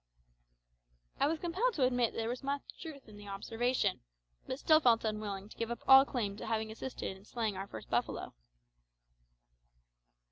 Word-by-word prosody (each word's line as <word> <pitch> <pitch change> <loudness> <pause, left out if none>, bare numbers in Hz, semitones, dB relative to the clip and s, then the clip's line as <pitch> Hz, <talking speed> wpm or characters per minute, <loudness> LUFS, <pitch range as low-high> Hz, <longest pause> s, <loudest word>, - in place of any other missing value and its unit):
I - - +4
was 320 +2 0
compelled 375 +9 0
to 280 - +1
admit 245 -2 +2
that - - -8
there 225 0 -1
was 245 +2 -3
much 280 0 -2 0.2
truth 300 -6 -8
in 210 -1 -12
the 205 0 -11
observation, 230 +5 0 0.5
but 260 - -3
still 310 +2 +5
felt 235 -6 +4
unwilling 210 -2 -3
to - - -14
give 230 0 -2
up 235 - -5
all 270 0 +10
claim 215 -8 -2
to - - -6
having 220 -1 -1
assisted 225 -3 -5
in 190 - -16
slaying 220 -1 -2
our 195 +1 -5
first - - -9
buffalo. - - -1
235 Hz, 175 wpm, -33 LUFS, 215-270 Hz, 0.5 s, all